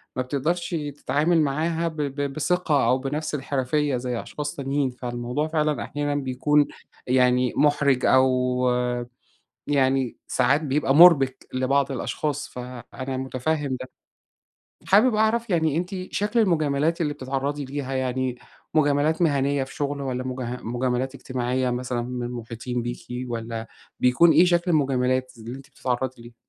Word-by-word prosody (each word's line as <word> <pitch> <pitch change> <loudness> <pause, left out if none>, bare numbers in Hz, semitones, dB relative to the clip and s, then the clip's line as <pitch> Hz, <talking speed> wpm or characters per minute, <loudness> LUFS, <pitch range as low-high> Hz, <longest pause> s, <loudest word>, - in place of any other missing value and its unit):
ما 130 - 0
بتقدَرش 160 +7 -1 0.2
تتعامل 155 +5 +2
معاها 160 +4 0
ب 160 - -5
ب 145 -1 -2
بثِقة 155 -3 +1
أو 125 +2 +4
بنفْس 150 +3 -3
الحِرفية 140 0 0
زي 120 -1 -3
أشخاص 150 0 -5
تانيين، 140 0 -1
فالموضوع 125 +3 -3
فعلًا 155 -2 0
أحيانًا 145 0 -2
بيكون 145 +2 +2 0.4
يعني 125 0 +3
مُحرِج 140 -3 +3
أو 130 0 +5 1.4
يعني 135 -3 +1
ساعات 135 +4 +2
بيبقى 140 -1 +1
مُربِك 145 -6 +6
لبعض 135 +2 +1
الأشخاص، 145 +3 -3
فأنا 125 +1 -7
متفهِّم 130 +1 -2
ده. 130 - -5 1.0
حابب 220 +5 +5
أعرَف 220 +1 +1
يعني 160 -4 +2
أنتِ 180 +3 -2 0.2
شكل 210 +3 +1
المجاملات 160 -4 +1
اللي 150 -3 0
بتتعرَّضي 140 +1 -3
ليها 135 0 -5
يعني، 130 -1 -1 0.4
مجاملات 155 +2 +2
مهنيَّة 140 -3 +2
في 130 - -13
شُغل 145 0 -2
والّا 130 -2 -3
مج 130 0 -4 0.2
مجاملات 125 +3 -1
إجتماعية، 130 -1 -1
مثلًا 125 -1 -2
من 125 0 -4
المحيطين 120 0 -5
بيكِ 120 +1 -6 0.2
والّا 115 -1 -4 0.3
بيكون 125 +7 +5
إيه 180 - +6
شكْل 175 0 +2
المجاملات 130 -4 +1
اللي 115 +3 -7
أنتِ 135 0 -13
بتتعرَّضي 130 -2 -3
ليها؟ 120 0 -13
135 Hz, 135 wpm, -24 LUFS, 125-150 Hz, 1.4 s, مُربِك